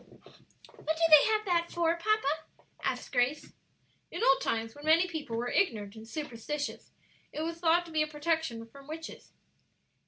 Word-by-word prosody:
"What 315 +1 -3
do 335 - 0
they 305 -2 +9
have 430 -1 +1
that 340 -3 +1
for, 335 -1 +1
papa?" 335 -5 0 0.4
asked - - -2
Grace. 260 +4 0 0.6
"In 345 - -4
old 270 - +5
times 225 0 -1
when 290 - -13
many 325 +4 +4
people 300 -9 -4
were 245 +1 -2
ignorant 215 - 0
and 220 0 -11
superstitious, 290 +2 -5 0.4
it 305 - -4
was 335 +1 -4
thought 340 +1 +3
to 335 - -11
be 310 -1 +1
a 305 - +1
protection 300 -6 -2
from 275 +4 -15
witches." 320 +1 -8
310 Hz, 165 wpm, -30 LUFS, 250-335 Hz, 0.6 s, they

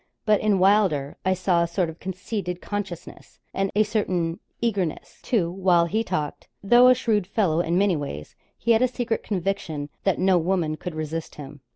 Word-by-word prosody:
But 215 -2 +3
in 210 -2 +2
Wylder's 185 -8 +3
I 185 0 +2
saw 180 -1 +1
a 170 - +1
sort 170 +1 0
of 160 +1 -9
conceited 185 -1 -4
consciousness, 195 -5 -7
and 195 0 0
a 215 - +5
certain 185 -5 -1 0.2
eagerness, 200 -9 -2
too, 180 -9 0
while 180 -2 +3
he 215 +6 0
talked; 155 -8 -4 0.2
though 240 +5 +6
a 255 - +7
shrewd 215 -6 0
fellow 190 -6 +1
in 170 0 +1
many 195 -2 +3
ways, 110 - -6 0.2
he 235 - 0
had 225 0 +4
a 255 - +4
secret 240 -2 -2
conviction 175 -7 -3
that 195 - +1
no 185 -1 +3
woman 170 -2 0
could 170 +1 -7
resist 155 +1 -5
him. 145 -1 -10
185 Hz, 185 wpm, -24 LUFS, 165-205 Hz, 0.2 s, a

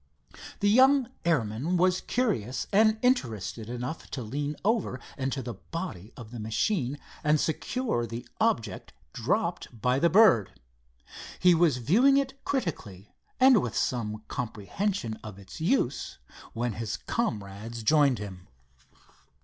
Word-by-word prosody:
The 205 - +4
young 265 +2 +5 0.2
airman 145 +2 +1
was 180 +1 +3
curious 135 - -1
and 215 +2 +5
interested 115 - 0
enough 125 +6 -5
to 130 - -5
lean 145 +6 -3
over 215 - +1 0.2
into 135 0 -2
the 120 - -5
body 165 - -7
of 115 -2 -10
the 120 - -7
machine 125 - -1 0.3
and 150 0 +3
secure 160 - -1
the 115 +1 -7
object 115 - -1 0.2
dropped 115 - -2
by 125 +4 +2
the 170 - +4
bird. 180 - +5 0.8
He 180 -1 +5
was 165 -5 +3
viewing 235 - +4
it 275 0 -2
critically 110 - -4 0.3
and 260 -5 +7
with 120 - -4
some 110 -3 -1
comprehension 120 - -3
of 105 -3 -8
its 100 +9 -11
use, 165 - 0 0.4
when 120 0 -2
his 110 0 -4
comrades 110 - -4
joined 140 0 +4
him. 95 -3 -8
130 Hz, 130 wpm, -28 LUFS, -, 0.8 s, and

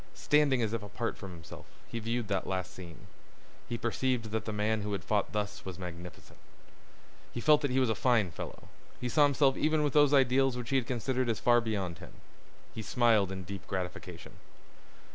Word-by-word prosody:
Standing 145 -4 +3
as 110 0 -1
if 115 - -1
apart 105 +3 -4
from 95 - -9
himself, 85 -3 -11 0.2
he 115 - -4
viewed 115 0 -2
that 100 -2 -1
last 95 -1 -3
scene. 85 -4 -11 0.6
He 120 - -2
perceived 120 -1 -1
that 110 0 -2
the 110 - -3
man 105 +1 0
who 105 0 -3
had 100 - -3
fought 105 -2 0
thus 105 -1 -3
was 95 -2 -7
magnificent. 90 -2 -9 0.9
He - - -5
felt 150 +4 +5
that 145 - 0
he 130 +1 +2
was 130 -3 +2
a - - +2
fine 110 -6 +2
fellow. - - -8 0.3
He 125 - -2
saw 150 - +3
himself 140 -1 +3
even 155 0 +2
with 145 - 0
those 145 -2 +5
ideals 135 -1 +4
which 120 -2 -5
he 135 - +4
had 125 -3 -1
considered 130 0 -1
as 115 - 0
far 120 -1 +4
beyond 95 -7 -3
him. - - -11 0.6
He 110 - -5
smiled 110 -3 +3
in 95 -1 -5
deep 95 -1 -8
gratification. 90 -2 -6
115 Hz, 200 wpm, -31 LUFS, 100-130 Hz, 0.9 s, felt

